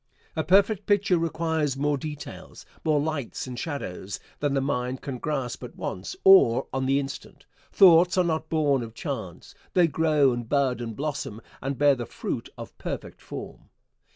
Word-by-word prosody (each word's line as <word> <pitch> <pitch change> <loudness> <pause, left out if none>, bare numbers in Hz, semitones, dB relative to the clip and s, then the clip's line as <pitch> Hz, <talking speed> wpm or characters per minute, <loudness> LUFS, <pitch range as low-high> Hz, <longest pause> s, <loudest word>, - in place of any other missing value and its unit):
A 160 - 0
perfect 200 +3 +3
picture 200 -4 +3
requires 160 -4 -1
more 145 +1 +1
details, 150 +1 -8 0.2
more 155 -2 +2
lights 145 -4 -3
and 125 -1 -6
shadows, 100 - -5 0.2
than 145 -1 0
the - - +3
mind 130 -1 -2
can 130 -3 -5
grasp 135 -5 -3
at - - -9
once, 95 - -5
or 190 -12 +7
on 130 0 -1
the 135 +1 +3
instant. 140 0 -7 0.3
Thoughts 180 -1 +6
are 185 - +5
not 160 -2 -1
born 145 -5 +2
of 115 -1 -8
chance. 110 - -6 0.2
They 180 -2 +6
grow 155 -3 +3
and 120 -1 -5
bud 135 -4 +1
and 115 -2 -5
blossom, 145 -6 -4 0.2
and 135 0 -3
bear 145 -1 +5
the 120 -4 -5
fruit - - -4
of - - -9
perfect - - -6
form. - - -9
145 Hz, 170 wpm, -26 LUFS, 130-160 Hz, 0.3 s, or